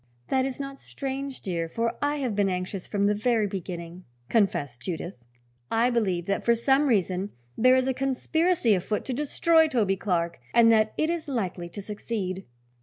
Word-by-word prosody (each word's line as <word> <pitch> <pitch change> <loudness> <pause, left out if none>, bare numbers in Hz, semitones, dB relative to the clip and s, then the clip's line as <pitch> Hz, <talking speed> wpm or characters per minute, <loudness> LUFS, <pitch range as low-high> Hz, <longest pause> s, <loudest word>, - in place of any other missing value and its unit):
"That 260 -1 +2
is 265 0 -6
not 275 0 -6
strange, 275 0 -5
dear, 170 -3 -2
for 230 +5 -1
I 290 +1 +1
have 255 -7 -2
been 200 -1 +2
anxious 180 +1 -3
from 200 -1 0
the 205 - +3
very 220 +1 +1
beginning," 180 -2 -6 0.2
confessed 145 - +1
Judith. 170 +4 -4 0.6
"I 235 +2 +2
believe 190 -8 0
that 200 +1 -1
for 235 - +4
some 270 +5 +3
reason 195 -4 +1 0.3
there 255 +2 +5
is 260 0 +2
a 265 - +2
conspiracy 270 +1 +1
afoot 200 +3 -1
to 260 - -2
destroy 320 +4 +3
Toby 210 -9 +1
Clark, 170 -3 -1 0.2
and 230 -1 +7
that 215 -1 +3
it 310 +2 +1
is 340 -3 -3
likely 190 -9 -3
to 200 +3 -7
succeed." 195 -2 -4
220 Hz, 180 wpm, -26 LUFS, 185-265 Hz, 0.6 s, and